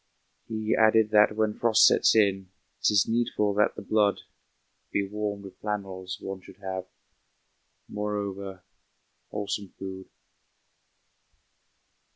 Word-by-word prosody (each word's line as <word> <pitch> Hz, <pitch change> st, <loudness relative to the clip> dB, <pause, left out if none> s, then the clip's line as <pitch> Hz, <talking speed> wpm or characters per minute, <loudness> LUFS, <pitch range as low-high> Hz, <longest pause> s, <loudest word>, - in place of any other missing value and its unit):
He 110 Hz, -1 st, -1 dB
added 110 Hz, -1 st, +4 dB
that 105 Hz, 0 st, +5 dB
when 110 Hz, -1 st, +1 dB
frost 115 Hz, -2 st, +4 dB
sets -, -, +5 dB
in 95 Hz, -3 st, +2 dB, 0.3 s
'Tis 100 Hz, -2 st, +3 dB
needful 115 Hz, -3 st, 0 dB
that 105 Hz, +1 st, +2 dB
the -, -, -7 dB
blood 105 Hz, -2 st, +2 dB, 0.7 s
Be 100 Hz, -1 st, 0 dB
warmed 105 Hz, 0 st, -4 dB
with 95 Hz, -, -12 dB
flannels; 95 Hz, -3 st, -4 dB
one 95 Hz, -1 st, -6 dB
should 95 Hz, -, -15 dB
have, 95 Hz, -2 st, -5 dB, 1.0 s
Moreover, 100 Hz, -2 st, -4 dB, 0.7 s
wholesome 105 Hz, 0 st, -3 dB
food. 95 Hz, -1 st, -7 dB
100 Hz, 110 wpm, -27 LUFS, 95-105 Hz, 1.0 s, that